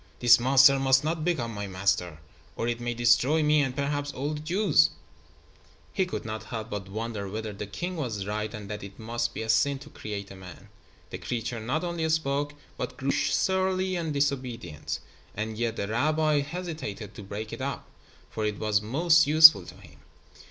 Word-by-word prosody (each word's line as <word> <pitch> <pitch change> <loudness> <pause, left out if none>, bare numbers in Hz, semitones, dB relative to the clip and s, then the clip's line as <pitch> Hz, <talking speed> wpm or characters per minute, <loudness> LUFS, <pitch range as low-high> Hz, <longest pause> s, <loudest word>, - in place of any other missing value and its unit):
"This 120 0 +6
monster 135 +2 +6
must 135 +1 +4
not 160 +1 -2
become 135 -10 -1
my 100 -1 -5
master, 95 -3 -1 0.4
or 115 - -2
it 120 0 -2
may 120 0 -3
destroy 120 +6 +3
me 150 0 +4
and 130 -3 -1
perhaps 145 0 -2
all 145 +3 -3
the 150 - -5
Jews." 180 +8 +3 1.0
He 190 -2 0
could 180 - -5
not 110 0 -5
help 110 -3 -6
but 100 -2 -5
wonder 110 -1 -4
whether 110 +1 -5
the 100 +1 -6
king 175 - -5
was 110 -10 -3
right 105 +1 -3
and 105 -2 -8
that 105 0 -6
it 100 0 -10
must 120 +1 -3
be - - -3
a - - -6
sin 135 +5 +3
to 145 +2 -13
create 100 -2 -6
a - - -9
man. 90 -2 -12 0.4
The - - -6
creature 115 0 -4
not 130 +9 -2
only 170 -2 -2
spoke, 145 -2 0 0.2
but - - -5
grew 135 0 -1
surly 185 +6 +1
and 165 -3 -2
disobedient, 130 - -2 0.4
and 110 +1 -3
yet 115 0 -2
the 100 - -3
rabbi 150 +6 +1
hesitated 155 - -5
to - - -10
break 105 +2 -6
it - - -6
up, - - -4 0.4
for 110 - -4
it 105 -1 -1
was 105 -1 +1
most 155 +7 +3
useful 155 - +8
to - - -11
him. - - -17
120 Hz, 190 wpm, -27 LUFS, 105-150 Hz, 1.0 s, useful